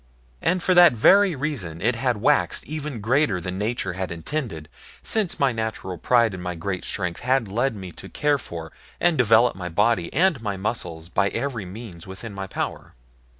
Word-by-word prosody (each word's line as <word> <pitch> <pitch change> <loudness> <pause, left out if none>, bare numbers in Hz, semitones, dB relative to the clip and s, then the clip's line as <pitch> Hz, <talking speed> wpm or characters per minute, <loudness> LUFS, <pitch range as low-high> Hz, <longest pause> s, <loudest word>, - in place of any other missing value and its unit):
And 180 0 +1
for 185 - +3
that 175 -5 +8
very 190 - +5
reason 125 - -4
it 115 +7 +1
had 125 0 0
waxed 140 +8 +2
even 150 -6 -5
greater 115 -3 +2
than 90 +2 -5
nature 105 -3 -2
had 95 -1 -4
intended, 85 - -4 0.4
since 215 -6 -1
my 140 -2 +3
natural 110 -6 -4
pride 115 -1 +3
in 90 - -6
my 90 0 -4
great 90 +2 -4
strength 90 -3 -3
had 130 -2 +1
led 120 +5 0
me 95 -3 -7
to 95 - -11
care 145 -1 +1
for 80 -8 -7 0.3
and 175 -2 +3
develop 120 -2 +4
my 90 -2 -5
body 95 0 +1
and 170 -7 +2
my 100 -3 -3
muscles 90 -6 -3
by 100 +3 +1
every 120 -2 -3
means 95 -3 -9
within 95 +3 -8
my 95 -1 -5
power. - - -5
110 Hz, 185 wpm, -24 LUFS, 90-135 Hz, 0.4 s, that